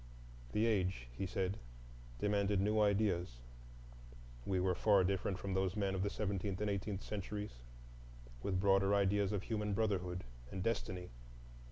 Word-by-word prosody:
The 110 Hz, -, +3 dB
age, 95 Hz, -, 0 dB
he 95 Hz, -, -2 dB
said, 95 Hz, +2 st, -1 dB, 0.6 s
demanded 100 Hz, +1 st, +2 dB
new 105 Hz, +2 st, +3 dB
ideas; 100 Hz, -, +2 dB, 1.1 s
we 95 Hz, -2 st, +1 dB
were 90 Hz, 0 st, +2 dB
far 100 Hz, +1 st, +4 dB
different 95 Hz, 0 st, 0 dB
from 95 Hz, 0 st, -3 dB
those 95 Hz, -1 st, +1 dB
men 100 Hz, -2 st, 0 dB
of 95 Hz, -, -1 dB
the 100 Hz, -, +1 dB
seventeenth 100 Hz, -2 st, -2 dB
and 105 Hz, 0 st, 0 dB
eighteenth 100 Hz, 0 st, -2 dB
centuries,—with -, -, -6 dB
broader 95 Hz, +1 st, +4 dB
ideas 100 Hz, 0 st, +2 dB
of 100 Hz, -2 st, -1 dB
human 105 Hz, -2 st, -1 dB
brotherhood 95 Hz, -4 st, 0 dB, 0.3 s
and 95 Hz, +5 st, -4 dB
destiny. 95 Hz, -5 st, -2 dB
95 Hz, 140 wpm, -37 LUFS, 90-105 Hz, 1.1 s, far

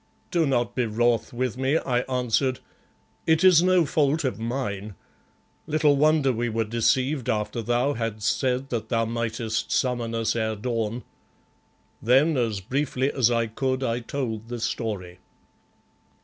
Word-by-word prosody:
"Do 170 Hz, -4 st, +2 dB
not 120 Hz, -3 st, 0 dB
be 125 Hz, -2 st, 0 dB
wrath 115 Hz, +2 st, +1 dB
with 125 Hz, 0 st, -3 dB
me," 135 Hz, +4 st, +2 dB
I 125 Hz, -6 st, 0 dB
answered, 125 Hz, +1 st, +1 dB, 0.7 s
"it 160 Hz, +2 st, +3 dB
is 180 Hz, -3 st, +7 dB
no 180 Hz, -2 st, +4 dB
fault 150 Hz, +1 st, +1 dB
of 130 Hz, -4 st, -2 dB
mine. 110 Hz, -4 st, -4 dB, 0.7 s
Little 150 Hz, -2 st, +3 dB
wonder 150 Hz, -2 st, +3 dB
we 120 Hz, +1 st, -1 dB
were 115 Hz, 0 st, 0 dB
deceived 125 Hz, +4 st, 0 dB
after 110 Hz, +2 st, -1 dB
thou 120 Hz, +5 st, +1 dB
hadst 115 Hz, -3 st, -1 dB
said 130 Hz, 0 st, -1 dB
that 110 Hz, -2 st, -3 dB
thou 115 Hz, -2 st, +1 dB
mightest 115 Hz, -1 st, -2 dB
summon 120 Hz, -3 st, 0 dB
us 115 Hz, 0 st, 0 dB
ere 110 Hz, -1 st, -1 dB
dawn." 115 Hz, +1 st, -3 dB, 1.0 s
Then 135 Hz, +7 st, +4 dB
as 115 Hz, -6 st, -1 dB
briefly 135 Hz, +4 st, -1 dB
as 125 Hz, -4 st, +3 dB
I 115 Hz, -1 st, +1 dB
could 130 Hz, +4 st, -2 dB
I 115 Hz, -1 st, 0 dB
told 115 Hz, -3 st, -4 dB
the 120 Hz, 0 st, -5 dB
story. 100 Hz, -6 st, -4 dB
120 Hz, 150 wpm, -25 LUFS, 115-135 Hz, 1.0 s, is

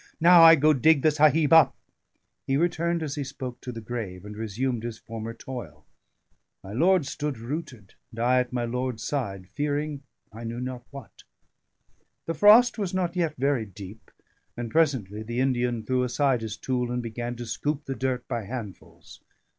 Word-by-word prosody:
"Now 170 Hz, +1 st, +7 dB
I 165 Hz, 0 st, +10 dB
go 155 Hz, +1 st, +4 dB
dig 150 Hz, +1 st, +4 dB
the 155 Hz, -, +5 dB
Sahib 155 Hz, +1 st, +4 dB
up." 145 Hz, -5 st, +6 dB, 0.7 s
He 135 Hz, -, +2 dB
returned 170 Hz, 0 st, 0 dB
as 145 Hz, -3 st, -3 dB
he 145 Hz, -, -3 dB
spoke 130 Hz, -2 st, -7 dB
to 125 Hz, -, -6 dB
the 115 Hz, -1 st, -7 dB
grave, 105 Hz, -5 st, -6 dB
and 105 Hz, 0 st, -8 dB
resumed 115 Hz, +3 st, -2 dB
his 115 Hz, -1 st, -5 dB
former 115 Hz, 0 st, -7 dB
toil. 115 Hz, -, -9 dB, 0.8 s
My 95 Hz, -, -9 dB
lord 175 Hz, -, +3 dB
stood 145 Hz, -1 st, -4 dB
rooted, 120 Hz, -, -7 dB, 0.2 s
and 115 Hz, -, -11 dB
I 125 Hz, +2 st, +3 dB
at 125 Hz, -1 st, -2 dB
my 120 Hz, -1 st, -1 dB
lord's 125 Hz, -1 st, -3 dB
side, 100 Hz, -10 st, -3 dB
fearing 145 Hz, +4 st, -2 dB, 0.3 s
I 115 Hz, +2 st, -9 dB
knew 115 Hz, +1 st, -5 dB
not 125 Hz, -1 st, -6 dB
what. 140 Hz, -1 st, -12 dB, 1.0 s
The 165 Hz, -, -2 dB
frost 215 Hz, +8 st, +6 dB
was 190 Hz, -3 st, -2 dB
not 180 Hz, -1 st, -1 dB
yet 165 Hz, -4 st, 0 dB
very 130 Hz, -4 st, 0 dB
deep, 100 Hz, +2 st, -11 dB, 0.5 s
and 120 Hz, -2 st, -5 dB
presently 130 Hz, -11 st, +1 dB
the 120 Hz, +2 st, -4 dB
Indian 125 Hz, -3 st, 0 dB
threw 130 Hz, +3 st, 0 dB
aside 125 Hz, 0 st, +1 dB
his 110 Hz, -1 st, -5 dB
tool, 125 Hz, -1 st, -2 dB
and 125 Hz, 0 st, -2 dB
began 120 Hz, +1 st, -5 dB
to 120 Hz, 0 st, -7 dB
scoop 145 Hz, +6 st, -3 dB
the 135 Hz, -, -3 dB
dirt 130 Hz, 0 st, -3 dB
by 120 Hz, -4 st, -3 dB
handfuls. 110 Hz, -4 st, -9 dB
125 Hz, 180 wpm, -26 LUFS, 115-150 Hz, 1.0 s, I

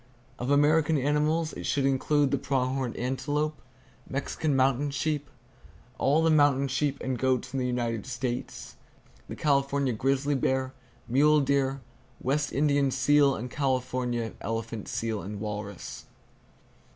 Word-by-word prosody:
Of 125 Hz, -, -3 dB
American 150 Hz, +2 st, +4 dB
animals 150 Hz, +3 st, +1 dB
it -, -, -5 dB
should 140 Hz, -1 st, +1 dB
include 135 Hz, +1 st, +2 dB
the 140 Hz, -, +1 dB
prong 130 Hz, -2 st, 0 dB
horned 130 Hz, -3 st, -3 dB
antelope, 150 Hz, +4 st, -2 dB, 0.5 s
Mexican 140 Hz, +2 st, -1 dB
mountain 135 Hz, +2 st, +2 dB
sheep, 145 Hz, 0 st, -2 dB, 0.7 s
all 150 Hz, +4 st, +3 dB
the 165 Hz, -, +4 dB
mountain 145 Hz, -3 st, +4 dB
sheep 140 Hz, +1 st, 0 dB
and 130 Hz, -2 st, -2 dB
goats 130 Hz, -1 st, 0 dB
in 135 Hz, -, -1 dB
the 125 Hz, -, 0 dB
United 120 Hz, -3 st, -2 dB
States, 125 Hz, -2 st, -5 dB, 0.5 s
the -, -, -5 dB
California 140 Hz, -2 st, +1 dB
grizzly 135 Hz, +4 st, 0 dB
bear, 130 Hz, -1 st, 0 dB, 0.3 s
mule 150 Hz, +5 st, +4 dB
deer, 135 Hz, -1 st, +1 dB, 0.4 s
West 140 Hz, +2 st, 0 dB
Indian 140 Hz, -1 st, +2 dB
seal 145 Hz, +1 st, +3 dB
and 125 Hz, +3 st, -6 dB
California 125 Hz, -4 st, -1 dB
elephant 115 Hz, 0 st, -4 dB
seal 110 Hz, -2 st, -2 dB
and 100 Hz, +1 st, -6 dB
walrus. 105 Hz, -2 st, -6 dB
135 Hz, 135 wpm, -28 LUFS, 125-145 Hz, 0.7 s, American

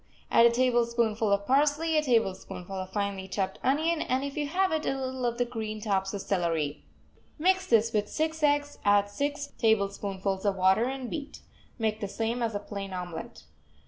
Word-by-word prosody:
Add 235 Hz, -, +7 dB
a -, -, +5 dB
tablespoonful 235 Hz, -3 st, +1 dB
of 200 Hz, 0 st, +2 dB
parsley, 295 Hz, +5 st, +2 dB
a 305 Hz, -, +4 dB
tablespoonful 195 Hz, -7 st, -1 dB
of 185 Hz, 0 st, -4 dB
finely 200 Hz, -1 st, -2 dB
chopped 190 Hz, 0 st, -2 dB
onion, 315 Hz, +5 st, +1 dB
and, 260 Hz, +2 st, 0 dB
if 280 Hz, 0 st, -4 dB
you 295 Hz, -1 st, -1 dB
have 375 Hz, +5 st, +1 dB
it, 315 Hz, -1 st, 0 dB
a -, -, +1 dB
little 260 Hz, -1 st, -2 dB
of 235 Hz, 0 st, -2 dB
the 245 Hz, -, +1 dB
green 220 Hz, -3 st, -5 dB
tops 195 Hz, -3 st, 0 dB
of 200 Hz, -, -4 dB
celery. 165 Hz, -6 st, -1 dB, 0.5 s
Mix 375 Hz, +4 st, +2 dB
this 230 Hz, 0 st, +3 dB
with 210 Hz, -1 st, 0 dB
six 315 Hz, 0 st, -2 dB
eggs, 290 Hz, -1 st, +1 dB
add 205 Hz, 0 st, +3 dB
six 285 Hz, +4 st, -3 dB
tablespoonfuls 200 Hz, -3 st, 0 dB
of 200 Hz, -2 st, +1 dB
water 190 Hz, +4 st, +4 dB
and 260 Hz, 0 st, -4 dB
beat. 295 Hz, -2 st, -6 dB, 0.4 s
Make 220 Hz, -2 st, -1 dB
the 205 Hz, -, -3 dB
same 225 Hz, +4 st, -2 dB
as 225 Hz, -2 st, -1 dB
a -, -, 0 dB
plain 200 Hz, -2 st, -6 dB
omelet. 175 Hz, -, -6 dB
225 Hz, 185 wpm, -28 LUFS, 200-280 Hz, 0.5 s, Add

